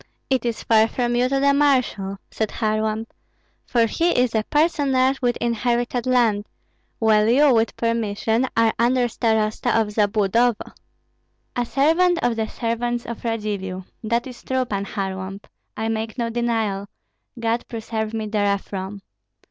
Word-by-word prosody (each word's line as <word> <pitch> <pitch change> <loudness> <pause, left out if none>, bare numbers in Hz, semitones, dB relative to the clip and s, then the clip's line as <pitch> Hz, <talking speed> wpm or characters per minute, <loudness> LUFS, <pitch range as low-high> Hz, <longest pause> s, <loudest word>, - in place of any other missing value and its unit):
"It 255 -2 +1
is 235 -2 -2
far 220 -1 +4
from 240 +1 -1
you 250 +1 +2
to 275 0 +1
the 280 0 +4
marshal," 255 -9 +1
said 220 -1 -1
Kharlamp; 215 0 -1 0.6
"for 235 -2 +3
he 330 +7 +1
is 250 -2 +2
a 220 - +2
personage 275 -4 +2
with 245 -1 +1
inherited 240 +1 -1
land, 230 -5 +2 0.5
while 220 -1 +3
you 275 +3 +5
with 225 0 +1
permission 230 +1 0
are 230 -1 +4
under 245 +1 +3
starosta 220 0 +1
of 215 -2 0
Zabludovo." 210 +2 +1 0.8
"A 245 - 0
servant 330 +8 +3
of 240 -1 +2
the 220 -1 -1
servants 240 +1 -2
of 235 - -7
Radzivill. 205 -5 -3 0.2
That 235 +2 0
is 250 -2 -10
true, 260 -1 0
Pan 200 -4 -3
Kharlamp, 195 0 -5 0.3
I 220 +1 -1
make 220 +1 -3
no 235 -1 -1
denial; 225 -4 -1 0.5
God 230 +1 -1
preserve 220 -1 -4
me 220 -1 -3
therefrom. 200 -2 -2
230 Hz, 145 wpm, -22 LUFS, 215-245 Hz, 0.8 s, you